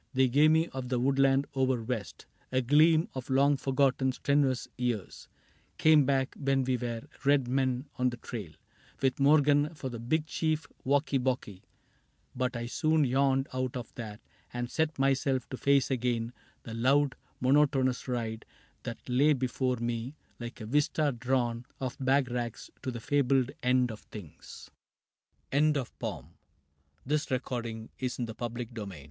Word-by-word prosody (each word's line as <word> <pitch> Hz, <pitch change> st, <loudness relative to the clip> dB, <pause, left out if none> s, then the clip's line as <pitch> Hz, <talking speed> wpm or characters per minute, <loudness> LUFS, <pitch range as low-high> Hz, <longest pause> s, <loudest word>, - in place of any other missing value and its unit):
They 130 Hz, 0 st, +4 dB
gave 145 Hz, +5 st, +5 dB
me 160 Hz, +1 st, +3 dB
of 130 Hz, -2 st, -6 dB
the 125 Hz, -1 st, +1 dB
woodland 135 Hz, +1 st, +3 dB
over 130 Hz, -3 st, +1 dB
west, 110 Hz, -4 st, -5 dB, 0.3 s
A 130 Hz, -, +2 dB
gleam 155 Hz, +5 st, +5 dB
of 130 Hz, 0 st, -6 dB
long 140 Hz, +2 st, +4 dB
forgotten 135 Hz, -1 st, +1 dB
strenuous 135 Hz, -1 st, +1 dB
years 120 Hz, -6 st, -3 dB, 0.5 s
Came 155 Hz, -3 st, +5 dB
back, 135 Hz, -1 st, +1 dB
when 135 Hz, -1 st, +1 dB
we 130 Hz, 0 st, +1 dB
were 120 Hz, -2 st, -4 dB, 0.2 s
Red 140 Hz, -2 st, +3 dB
Men 130 Hz, 0 st, 0 dB
on 125 Hz, 0 st, +2 dB
the 120 Hz, -, -7 dB
trail, 110 Hz, -8 st, -7 dB, 0.5 s
With 135 Hz, 0 st, +1 dB
Morgan 145 Hz, +2 st, +4 dB
for 135 Hz, -3 st, -5 dB
the 120 Hz, -2 st, -6 dB
big 150 Hz, +7 st, 0 dB
chief 155 Hz, 0 st, -1 dB, 0.2 s
Wocky 140 Hz, 0 st, +2 dB
Bocky; 120 Hz, -7 st, -2 dB, 0.7 s
But 125 Hz, -1 st, -1 dB
I 120 Hz, -, -4 dB
soon 155 Hz, +5 st, +2 dB
yawned 135 Hz, +1 st, +2 dB
out 130 Hz, -1 st, -2 dB
of 120 Hz, -3 st, -8 dB
that 110 Hz, -3 st, -7 dB, 0.3 s
and 120 Hz, 0 st, -4 dB
set 160 Hz, -1 st, 0 dB
myself 135 Hz, -1 st, +1 dB
To 130 Hz, -, -5 dB
face 140 Hz, -1 st, +3 dB
again 120 Hz, -2 st, -1 dB, 0.3 s
the 115 Hz, -, -7 dB
loud 135 Hz, +4 st, +3 dB, 0.3 s
monotonous 135 Hz, -1 st, +2 dB
ride 115 Hz, -3 st, -3 dB, 0.4 s
That 115 Hz, -, -7 dB
lay 140 Hz, +5 st, +4 dB
before 130 Hz, -1 st, 0 dB
me 120 Hz, +3 st, -3 dB, 0.2 s
like 120 Hz, +1 st, -7 dB
a -, -, -5 dB
vista 145 Hz, +4 st, +1 dB
drawn 120 Hz, -1 st, -1 dB
Of 130 Hz, -2 st, -3 dB
bag 135 Hz, -1 st, +2 dB
racks 120 Hz, -2 st, -4 dB
to 130 Hz, -, -3 dB
the 120 Hz, -2 st, -4 dB
fabled 135 Hz, 0 st, +2 dB
end 125 Hz, -1 st, +2 dB
o 110 Hz, -, -7 dB
130 Hz, 135 wpm, -30 LUFS, 120-140 Hz, 0.7 s, gave